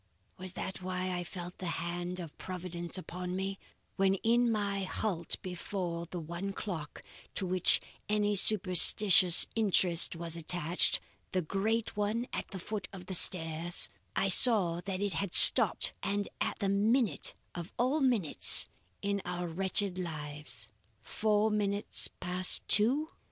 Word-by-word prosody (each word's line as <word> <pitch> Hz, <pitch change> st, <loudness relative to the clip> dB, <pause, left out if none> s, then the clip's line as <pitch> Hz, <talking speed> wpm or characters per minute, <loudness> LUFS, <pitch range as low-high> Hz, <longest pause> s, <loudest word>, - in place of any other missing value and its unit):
"Was 185 Hz, 0 st, -9 dB
that 190 Hz, 0 st, -8 dB
why 185 Hz, 0 st, -5 dB
I 175 Hz, -, -5 dB
felt 175 Hz, 0 st, -11 dB
the 185 Hz, -, -7 dB
hand 175 Hz, +2 st, -6 dB
of 165 Hz, -4 st, -10 dB
Providence 175 Hz, -1 st, -6 dB
upon 180 Hz, 0 st, -8 dB
me, 195 Hz, +1 st, -6 dB, 0.4 s
when 195 Hz, 0 st, 0 dB
in 235 Hz, +1 st, +1 dB
my 200 Hz, -2 st, -4 dB
halt 185 Hz, -3 st, -4 dB
before 180 Hz, -2 st, -7 dB
the 175 Hz, -, -8 dB
one 170 Hz, +5 st, -8 dB
clock 170 Hz, -8 st, -9 dB, 0.3 s
to 195 Hz, -, -1 dB
which 185 Hz, 0 st, +1 dB, 0.3 s
any 210 Hz, 0 st, -1 dB
superstitious 185 Hz, -2 st, +7 dB
interest 185 Hz, -6 st, +4 dB
was 165 Hz, 0 st, -5 dB
attached 170 Hz, +1 st, 0 dB, 0.3 s
the 185 Hz, -1 st, -2 dB
great 220 Hz, +7 st, -4 dB
one 210 Hz, +3 st, -3 dB
at -, -, -6 dB
the 195 Hz, -, -10 dB
foot 195 Hz, +1 st, -7 dB
of 185 Hz, -2 st, -12 dB
the 190 Hz, -, -8 dB
stairs 165 Hz, -1 st, +3 dB, 0.3 s
I 195 Hz, -, -1 dB
saw 185 Hz, -4 st, +4 dB
that 195 Hz, -1 st, -6 dB
it 205 Hz, -1 st, -3 dB
had 200 Hz, -3 st, -3 dB
stopped -, -, +7 dB
and 200 Hz, 0 st, -3 dB
at -, -, -4 dB
the 205 Hz, -, -5 dB
one 200 Hz, +3 st, -1 dB
minute 235 Hz, -, -2 dB, 0.2 s
of 175 Hz, 0 st, -9 dB
all 260 Hz, +6 st, -1 dB
minutes 235 Hz, -, +4 dB, 0.4 s
in 200 Hz, 0 st, -3 dB
our 180 Hz, 0 st, -6 dB
wretched 185 Hz, +2 st, -4 dB
lives: 150 Hz, -8 st, -7 dB, 0.3 s
Four 210 Hz, -, -2 dB
minutes 205 Hz, -1 st, +1 dB
past 180 Hz, +1 st, +1 dB
two? 270 Hz, +9 st, +1 dB
185 Hz, 145 wpm, -29 LUFS, 175-205 Hz, 0.4 s, superstitious